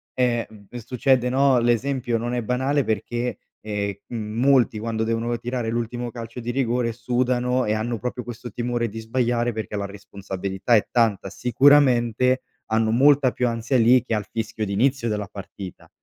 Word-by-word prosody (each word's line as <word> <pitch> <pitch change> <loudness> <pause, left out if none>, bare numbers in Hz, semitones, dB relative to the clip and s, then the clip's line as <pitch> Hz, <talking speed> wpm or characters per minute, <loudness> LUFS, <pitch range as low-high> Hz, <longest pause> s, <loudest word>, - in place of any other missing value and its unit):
eh, 120 -2 +1
mhmm, 105 -2 -16 0.2
succede 125 0 +2
no, 135 0 +4
l'esempio 120 +1 +1
non 120 +2 -3
è 120 -1 -1
banale 130 +5 +1
perché, 120 +2 -2 0.2
ehm, 100 -2 -3
m - - -6 0.2
molti 130 -4 +3
quando 110 0 -2
devono 115 +1 -1
tirare 120 0 -3
l'ultimo 120 +1 -3
calcio 115 +1 -7
di 120 0 -3
rigore, 120 -2 0
sudano 125 +1 0
e 105 - +1
hanno 115 +2 -2
proprio 125 +1 -4
questo 120 0 -8
timore 120 +1 -2
di 115 +2 -7
sbagliare 120 +1 0
perché 110 -1 -5
la 100 -1 -2
responsabilità 100 +1 -2
è 105 - +2
tanta, 110 -5 +1
sicuramente 125 +2 +3 0.2
hanno 110 0 +1
molta 135 +2 +5
più 125 - 0
ansia 115 +3 0
lì 120 +1 +5
che 125 - -3
al 105 -2 -2
fischio 110 -1 -3
di 100 - -5
inizio 125 +2 +1
della 105 -1 -2
partita 100 -2 -10
120 Hz, 170 wpm, -23 LUFS, 110-125 Hz, 0.2 s, molta